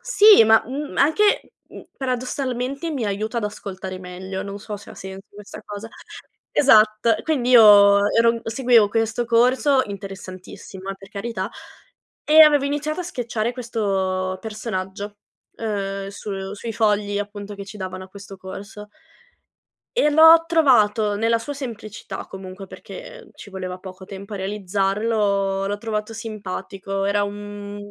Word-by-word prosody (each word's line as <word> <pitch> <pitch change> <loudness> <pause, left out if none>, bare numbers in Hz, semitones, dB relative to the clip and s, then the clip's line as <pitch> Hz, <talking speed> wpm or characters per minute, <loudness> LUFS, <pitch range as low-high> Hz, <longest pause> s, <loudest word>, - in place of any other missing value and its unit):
Sì, 420 - +7
ma, 220 0 +5
mhmm, 285 +4 -5
anche, 410 +9 +3 0.3
uhm, - - -11
mhmm, - - -12
paradossalmente 255 +3 -3
mi 270 -6 -2
aiuta 215 +3 -2
ad 225 - -3
ascoltare 190 -2 -6
meglio, 190 +1 -6
non 200 0 -7
so 210 0 -7
se - - -13
ha - - -11
senso 190 +1 -9
questa 205 0 -11
cosa. 205 +2 -8 0.7
Esatto, 215 -3 +5
quindi 265 -6 0
io 205 -3 +8
ero 230 0 +4
n 230 - -5
seguivo 230 -2 +3
questo 225 +2 -1
corso, 255 +4 +3
interessantissimo 195 -1 -9
eh, - - -5
per 195 0 -15
carità, 205 -1 -4 0.7
e 310 +1 +6
avevo 295 -2 +5
iniziato 295 +3 -2
a - - -2
sketchare 235 -8 -3
questo 195 -6 -2
personaggio, 205 -2 -5 0.4
uhm, 195 -3 -3
su 195 -1 -6
sui 225 +2 -6
fogli 205 -2 +1
appunto 205 0 -6
che 200 0 -8
ci 200 +2 -11
davano 185 0 -6
a - - -15
questo 195 0 -11
corso. 200 +3 -9 1.1
E 300 -11 +4
l'ho 320 +2 +8
trovato, 225 -10 +3
nella 230 +2 +2
sua 230 +6 -6
semplicità 225 -7 -7
comunque 190 0 -9
perché - - -11
ci 200 - -12
voleva 185 -1 -5
poco 185 0 -11
tempo 200 +2 -9
a - - -4
realizzarlo, 195 0 0
l'ho 205 +1 -2
trovato 215 0 -4
simpatico, 195 -3 -5
era 205 +1 +1
un 205 0 -6
210 Hz, 145 wpm, -22 LUFS, 195-235 Hz, 1.1 s, io